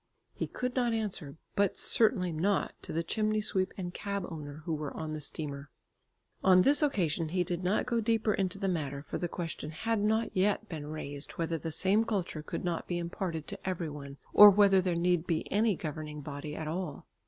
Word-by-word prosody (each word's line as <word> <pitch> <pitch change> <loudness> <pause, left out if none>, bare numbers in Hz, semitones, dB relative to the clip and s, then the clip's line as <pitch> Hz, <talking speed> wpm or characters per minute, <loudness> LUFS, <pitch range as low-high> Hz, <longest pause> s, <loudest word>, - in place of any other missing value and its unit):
He - - -3
could 250 0 -4
not 245 -3 +1
answer, 195 -10 -3 0.2
but 200 -2 +2
certainly 210 -6 +4
not 185 +5 0
to - - -6
the 165 +1 -1
chimney 215 +4 0
sweep 190 -3 +1
and 175 -2 -5
cab 200 -1 -3
owner 150 -2 -8
who 165 - -1
were 150 -1 -3
on 155 -1 -4
the 155 - -5
steamer. 145 -1 -3 0.7
On 185 -1 +6
this 290 +3 +6
occasion 170 - +1
he 180 +2 +1
did 175 +1 -3
not 185 +4 +1
go 235 -2 0
deeper 220 -1 +1
into 195 0 -1
the 195 -1 -2
matter, 145 -5 -2
for - - -4
the 175 - -1
question 165 -3 -5
had 225 +8 -1
not 220 +2 +1
yet 205 +3 +1
been 155 -6 -6
raised 145 -2 -5
whether 165 -1 -2
the 165 - -4
same 190 +7 +3
culture 190 -8 -2
could 150 - -5
not 170 -2 -2
be 175 - -1
imparted 170 -2 -3
to - - -4
every 170 -4 -3
one, 140 -1 -9 0.2
or 210 0 +11
whether 200 -1 +5
there 180 -2 0
need 175 0 +1
be 165 -3 0
any 210 0 +3
governing 150 -2 -6
body 145 +1 -6
at 155 - -5
all. 165 -1 -4
175 Hz, 205 wpm, -31 LUFS, 155-205 Hz, 0.7 s, or